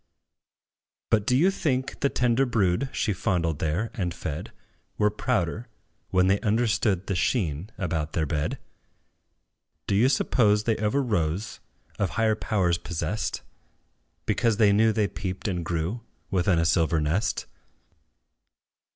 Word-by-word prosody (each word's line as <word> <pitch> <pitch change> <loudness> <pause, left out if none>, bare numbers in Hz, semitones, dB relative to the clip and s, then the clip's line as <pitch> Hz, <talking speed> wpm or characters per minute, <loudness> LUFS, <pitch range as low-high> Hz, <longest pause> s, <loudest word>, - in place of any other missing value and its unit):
But, 105 -2 +2
do 125 - +4
you 180 +7 +4
think 135 -8 -2
the 140 - +2
tender 125 +1 +2
brood 110 +2 +1
She 110 - 0
fondled 85 -5 -1
there, 85 +9 -1
and 90 -6 -3
fed, 75 -3 -5 0.5
Were 105 0 +3
prouder, 110 0 -1 0.4
when 90 0 +3
they 95 +2 +3
understood 105 -4 +1
The - - -2
sheen 90 - 0
about 80 -4 -2
their 80 - 0
bed? 75 0 -2 1.3
Do - - -1
you 115 +6 +4
suppose 105 -6 +3
they 115 0 +1
ever 110 +7 +1
rose 100 -3 -1 0.4
Of 100 - +1
higher 110 -1 +3
powers 95 -6 0
possessed, 85 +6 -3 0.8
Because 115 -3 +1
they 105 -3 +5
knew 110 +2 +4
they 110 -2 +1
peeped 95 +2 -5
and 90 -4 -2
grew 85 +7 -2 0.3
Within 90 -2 +2
a 80 - +2
silver 80 -1 +2
nest? 80 +8 0
100 Hz, 135 wpm, -26 LUFS, 85-115 Hz, 1.3 s, they